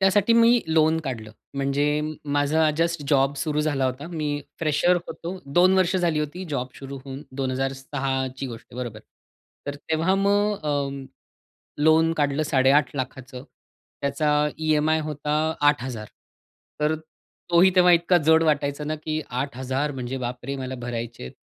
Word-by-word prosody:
त्यासाठी 200 +3 +4
मी 235 +1 +5
लोन 160 0 +3
काढलं. 115 -8 -5 0.2
म्हणजे 140 +2 +1 0.3
माझा 150 +2 +3
जस्ट 170 -1 0
जॉब 140 0 +3
सुरू 150 +1 -1
झाला 145 -3 0
होता. 130 +3 -2
मी 150 -4 -2 0.2
फ्रेशर 165 +3 +2
होतो. 175 +3 -6
2 175 +6 +4
वर्ष 185 -1 +2
झाली 170 -4 +1
होती 150 +5 -4
जॉब 130 -3 -2
सुरू 135 0 -7
होऊन, 135 +1 -7
2006ची 135 0 -2
गोष्ट 115 -3 -9
आहे, - - -12
बरोबर. 115 -4 -6 0.7
तर 145 - -3 0.2
तेव्हा 165 +4 +2
मग 205 +1 +2
अ, 140 -2 -2 0.8
लोन 160 +1 +5
काढलं 145 -1 0
8,50,000 135 -1 +2 0.8
त्याचा 140 +2 0 0.3
ई-एम-आय 155 0 +2
होता 150 -1 -4 0.4
8,000 125 -6 0 0.7
तर 150 +1 +2 0.6
तोही 175 +2 +6
तेव्हा 180 -1 +6
इतका 170 +1 +4
जड 160 +1 +5
वाटायचा 145 -2 0
ना, 155 +1 -2
की 155 0 -3
8,000 130 +2 -2
म्हणजे 130 -1 -4
बाप 125 -1 -5
रे! 140 +1 -3
मला 130 -1 -5
भरायचे 120 - -5
आहेत. 65 - -7
145 Hz, 145 wpm, -24 LUFS, 135-160 Hz, 0.8 s, तोही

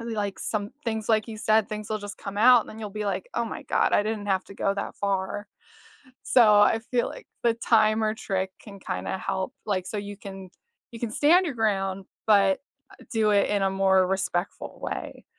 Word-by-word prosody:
like, 210 -4 -3
some 205 -1 -2
things 220 -2 -2
like 220 0 +2
you 220 - -6
said, 215 0 +2
things 215 0 -5
will 215 - 0
just 205 0 -8
come 200 0 -7
out 245 +2 +7
and - - -17
then 220 - -10
you'll 210 -2 -5
be 210 +1 -4
like, 205 - -2
“Oh - - 0
my - - -6
god, - - +1
I - - +4
didn't 215 -1 -3
have 190 -2 +1
to 195 - -12
go 195 0 0
that 200 - -4
far.” 200 +1 -2 0.8
So 250 - +5 0.2
I 205 +2 +5
feel 240 +1 -1
like - - -10 0.2
the 235 -1 +3
timer 215 -1 +3
trick 190 -3 -2
can 200 -2 -11
kinda 95 - -3
help, 190 +3 -3
like, 185 -3 -1
so 210 - -5
you 205 0 -6
can 195 -2 -9 0.4
you 230 - -8
can 235 - -2
stand 335 +10 +4
your 295 - -3
ground, 195 -4 -1 0.2
but, 200 -3 +4 0.3
uh - - -16
do 220 -2 +2
it 200 -1 +3
in 205 -1 +1
a 195 - +2
more 190 -1 +3
respectful 190 -1 -2
way. - - -5
205 Hz, 210 wpm, -26 LUFS, 195-220 Hz, 0.8 s, out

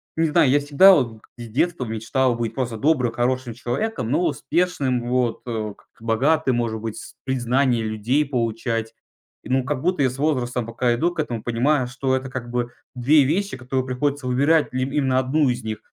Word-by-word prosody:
не 165 0 +2
знаю. 155 -2 +4
Я 145 +3 +4
всегда 145 +7 +6
вот 115 -8 0 0.2
из 120 -1 -8
детства 140 +4 0
мечтал 120 +3 0
быть 115 -1 -3
просто 125 -4 -3
добрым, 130 -1 +2
хорошим 125 0 -1
человеком, 125 - -3
но 175 - +2
успешным, 135 -5 -1
вот, 125 -2 0
э, 110 -3 -3
как-то 115 - -20
богатым, 130 +4 +2
может 115 -2 -1
быть, 110 -1 -5
с - - -10
признание 125 -1 +1
людей 110 +7 0
получать. 115 -3 -2 0.5
И - - -10
ну, 130 0 +2
как 135 0 -3
будто 180 -5 +1
я 130 - +3
с 130 - -9
возрастом 125 -5 0
пока 120 +1 0
иду 170 +9 +1
к - - -9
этому, 120 -7 -2
понимаю, 125 +3 +1
что 130 +1 -1
это 130 0 -3
как 125 -2 -6
бы 120 0 -1 0.3
2 140 +4 +4
вещи, 175 +4 -1
которые 130 0 -2
приходится 140 +1 -1
выбирать 140 +5 +3
либ 130 +1 -1
именно 135 -3 +1
1 135 +2 +2
из 120 -1 -2
них: 110 -1 -4
130 Hz, 190 wpm, -22 LUFS, 120-145 Hz, 0.5 s, всегда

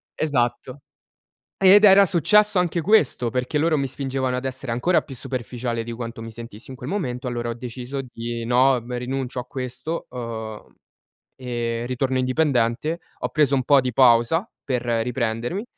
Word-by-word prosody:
esatto. 130 -2 -1 0.8
Ed 195 +2 +7
era 200 0 +8
successo 205 +4 +4
anche 175 -1 +1
questo, 155 - +2
perché 125 +5 -2
loro 155 0 +2
mi 140 - 0
spingevano 130 -1 -2
ad 125 - -4
essere 130 -1 -4
ancora 165 +10 +2
più 135 - -10
superficiale 120 -2 -4
di 120 - -6
quanto 115 0 -6
mi 115 0 -8
sentissi 115 +1 -10
in 130 - -8
quel 125 +1 -8
momento, 130 -10 -3
allora 120 -1 -3
ho - - -3
deciso 125 +3 -6
di: 120 -2 -6
"No, 125 +3 +4
ehm, 120 +1 -5
rinuncio 130 0 -4
a 125 - -3
questo, 130 +6 -5
ehm, 115 -3 -7 0.6
e 120 -2 -3
ritorno 130 +1 -1
indipendente," 130 +3 0 0.2
ho - - -2
preso 150 -3 +2
un 130 -2 +1
po' 140 +1 +5
di 125 -2 -3
pausa 125 - +4 0.2
per 125 -3 -2
riprendermi 120 - -1
125 Hz, 165 wpm, -23 LUFS, 120-140 Hz, 0.8 s, era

